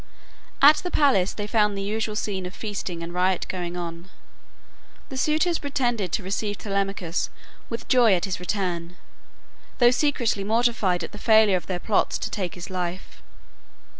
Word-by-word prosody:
At 295 +2 +9
the 360 - -3
palace 265 - +3
they 205 - -5
found 210 -1 +1
the - - -3
usual 215 +1 -2
scene 195 -3 -2
of 180 - -10
feasting 195 -5 -5
and 170 +1 -6
riot 180 0 +1
going 175 -1 -4
on. 170 +1 -6 1.0
The 270 - -7
suitors 315 +5 +1
pretended 240 - -1
to 205 - 0
receive 205 +2 -2
Telemachus 195 -4 -2 0.4
with 230 0 -5
joy 240 -6 +5
at 175 - -1
his 190 -3 -3
return, 180 -2 -3 0.8
though 240 -1 +6
secretly 250 -7 +1
mortified 215 -5 +1
at - - -6
the 210 - -10
failure 220 -3 +5
of 180 - -3
their 185 - -2
plots 210 +3 +1
to - - -4
take 185 -6 -3
his 175 +2 -8
life. 180 0 -5
200 Hz, 165 wpm, -25 LUFS, 180-230 Hz, 1.0 s, At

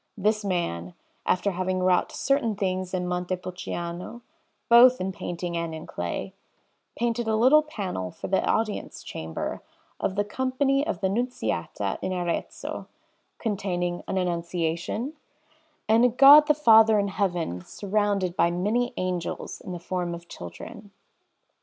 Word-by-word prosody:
This 215 +2 +1
man, 90 - -2 0.3
after 200 +2 +2
having 185 0 -1
wrought 185 -1 +2
certain 275 -6 0
things 185 -2 -2
in 180 -1 -2
Montepulciano 180 +3 -4 0.4
both 245 +2 +7
in 190 +1 -2
painting 175 -1 -5
and 170 -1 -3
in 160 - -8
clay, 90 - -4 0.6
painted 235 0 -1
a 220 - +2
little 260 +7 +6
panel 195 - -4
for - - -8
the 190 - +1
Audience 220 -2 -1
Chamber 80 0 -5 0.4
of 190 - -1
the 205 - +2
Company 260 +5 0
of 325 - -3
the 190 - +2
Nunziata 245 +6 -2
in 185 - -2
Arezzo, 175 -2 -3 0.5
containing 180 -5 -2
an - - -2
Annunciation, 175 - -2 0.7
and 225 +2 +5
a 250 - +6
God 280 +5 +8
the 300 - +4
Father 225 -6 +6
in 200 -1 +1
Heaven 175 - -2
surrounded 200 - -1
by 170 - +3
many 215 +8 0
angels 180 -2 -3
in - - -7
the 180 - -4
form 175 0 -3
of 170 0 -12
children. 85 - -9
185 Hz, 140 wpm, -26 LUFS, 175-225 Hz, 0.7 s, God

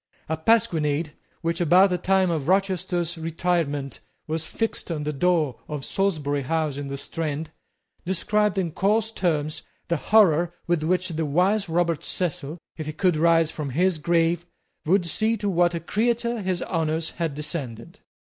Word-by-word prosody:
A 160 - 0
pasquinade, 160 -5 +1 0.3
which, 170 0 -1
about 180 +4 +5
the 180 - +1
time 190 -1 +2
of 155 -4 -2
Rochester's 180 -3 0
retirement, 160 -4 -1 0.3
was 160 +1 -3
fixed 225 -4 -3
on 155 -3 -2
the 150 +1 -2
door 155 -4 +1
of 150 -3 -5
Salisbury 155 -8 0
House 155 +1 -1
in 145 -1 -4
the 140 0 -4
Strand, 155 +1 -4 0.5
described 210 +3 +1
in 180 -4 0
coarse 215 +6 +1
terms 160 -6 -1 0.3
the 170 - +2
horror 175 -1 +4
with 175 -2 +1
which 180 +3 0
the 160 -1 -2
wise 185 +6 +2
Robert 170 -2 +1
Cecil, 160 -3 -3 0.2
if 155 -2 -5
he 155 - -3
could 180 0 +2
rise 165 0 +3
from 150 -3 -4
his 175 +5 +1
grave, 170 +2 +2 0.4
would 185 +1 +3
see 220 +7 +1
to 205 - -3
what 175 -2 +2
a - - -1
creature 235 +6 0
his 185 -2 -1
honours 160 -1 -1
had 160 -4 -1
descended. 140 -7 -6
170 Hz, 160 wpm, -25 LUFS, 155-185 Hz, 0.5 s, about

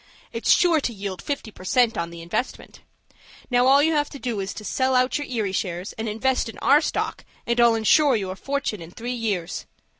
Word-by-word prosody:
It's - - -3
sure 335 -4 +4
to 250 - -1
yield 195 -2 -5
fifty 280 -6 -4
per 185 - -14
cent. 235 +4 +2
on 170 0 -2
the 170 0 -10
investment. 175 +9 -4 0.7
Now, 245 +1 +4
all 280 +2 +6
you 320 - +3
have 295 -2 +1
to - - -9
do 240 -6 -3
is 195 0 -3
to 215 - -8
sell 260 +3 +1
out 255 +3 +2
your 290 - -5
Erie 220 -6 -2
shares, 180 0 -3
and 220 0 -4
invest 245 +3 0
in 225 - -10
our 290 +3 +4
stock, 305 - -2 0.2
and 235 0 0
I'll 235 -1 +5
insure 265 +5 +4
you 195 -4 -2
a - - -6
fortune 275 -4 -3
in 165 - -9
three 240 +7 -5
years. 205 -8 -3
235 Hz, 220 wpm, -24 LUFS, 195-265 Hz, 0.7 s, all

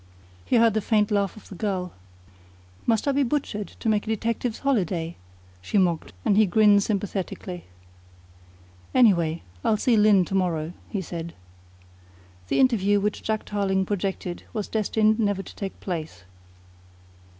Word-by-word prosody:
He - - +1
heard 230 -2 +5
the 220 - 0
faint 210 0 +2
laugh 200 0 0
of 215 - -13
the - - -10
girl. 185 -2 -3 0.9
"Must 225 +3 +2
I - - +4
be 280 +1 +1
butchered 235 -6 -1
to - - -4
make 215 -1 +1
a - - -3
detective's 230 +1 -1
holiday?" 180 - -1 0.5
she 150 - -1
mocked, 175 -4 +1
and 200 - +3
he 215 0 +5
grinned 205 +2 +5
sympathetically. 195 -3 -3 1.3
"Any 240 -5 +7
way, 165 -1 -2 0.2
I'll 215 - +2
see 235 +2 +2
Lyne 210 -3 +5
to - - -7
morrow," 170 -4 0 0.2
he 200 -3 -3
said. 170 0 -6 1.1
The - - +1
interview 205 -6 +3
which 210 +1 -1
Jack 220 0 -2
Tarling 195 -2 0
projected 190 -2 -3
was 215 -3 -3
destined 215 0 +1
never 205 -3 0
to - - -12
take 195 -2 -6
place. 160 - -5
205 Hz, 150 wpm, -25 LUFS, 185-220 Hz, 1.3 s, Any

